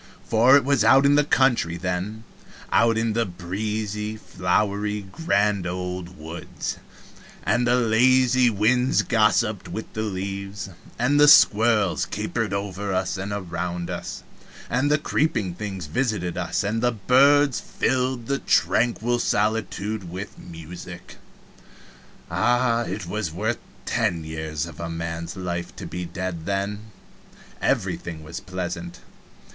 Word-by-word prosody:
For 120 +5 +5
it 140 - 0
was 140 -5 +3
out 130 +5 +6
in 140 - +5
the 145 +1 +5
country 125 - +2
then 95 +5 -3 0.5
out 115 -1 +4
in 115 -1 0
the 115 +1 +2
breezy, 105 +3 -4
flowery, 100 +2 -1
grand 100 - +1
old 90 0 -5
woods, 80 +3 -6 0.7
and 120 0 +1
the 120 - +4
lazy 125 +2 +4
winds 125 +5 +2
gossiped 110 -2 +2
with 110 +6 -6
the 110 - -3
leaves, 100 -1 -4 0.3
and 135 +5 +2
the 150 - +7
squirrels 110 -7 +5
capered - - -2
over 100 0 -3
us 95 +1 0
and 100 +1 -4
around 90 -2 -3
us, - - -6 0.5
and 130 +4 +2
the 150 - +4
creeping 145 - 0
things 95 -2 -5
visited 90 - -1
us, - - -1
and 110 +3 -1
the 120 0 +2
birds 135 +5 +4
filled 130 -2 -1
the 140 +3 -1
tranquil 120 0 +2
solitude 105 -3 -1
with 95 +4 -7
music. 85 +1 -10 1.1
Ah, 120 0 +2
it 95 +2 -4
was 100 -1 -3
worth 110 +7 -2 0.3
ten 85 -2 0
years 80 0 -4
of 85 -3 -11
a 85 0 -4
man's 85 +2 -5
life 85 -2 -4
to - - -7
be 90 +1 -5
dead 85 -2 -5
then! 100 +2 -2 0.8
Everything 80 -2 -1
was 80 +2 -6
pleasant. 90 -1 -5
105 Hz, 130 wpm, -24 LUFS, 90-120 Hz, 1.1 s, the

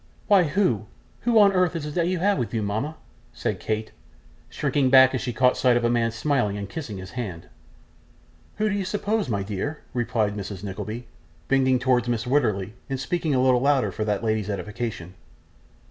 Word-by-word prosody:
'Why 195 -4 +5
who 145 - +1 0.3
who 235 -1 +2
on 200 -2 +6
earth 180 -2 +2
is 150 -2 -4
that 170 0 +1
you 185 0 0
have 200 0 +2
with 120 -2 -3
you, 110 - 0
mama?' 110 +10 -2 0.4
said - - -3
Kate, 110 0 -3 0.6
shrinking 135 -3 +1
back 130 0 +7
as 130 - -1
she 125 - -2
caught 125 +2 +3
sight 125 -2 +4
of 120 - -1
a 120 - +2
man 115 -1 +2
smiling 115 -3 0
and 100 -1 -5
kissing 110 -3 -6
his 95 0 -8
hand. 95 -9 -6 1.1
'Who 215 - 0
do 210 - 0
you 200 -1 -1
suppose, 205 - -1
my 100 -3 -1
dear?' 105 +10 -4
replied 110 -4 0
Mrs. 100 -1 -6
Nickleby, 105 +4 -5 0.4
bending 130 -1 +3
towards 125 -1 +1
Mrs 120 -1 -1
Wititterly, 110 -7 +1 0.2
and 135 -1 -2
speaking 160 0 -1
a 130 - +3
little 125 -2 +4
louder 135 -7 +2
for 110 - -3
that 105 0 -1
lady's 110 -2 0
edification. 100 -2 -4
125 Hz, 190 wpm, -24 LUFS, 105-145 Hz, 1.1 s, back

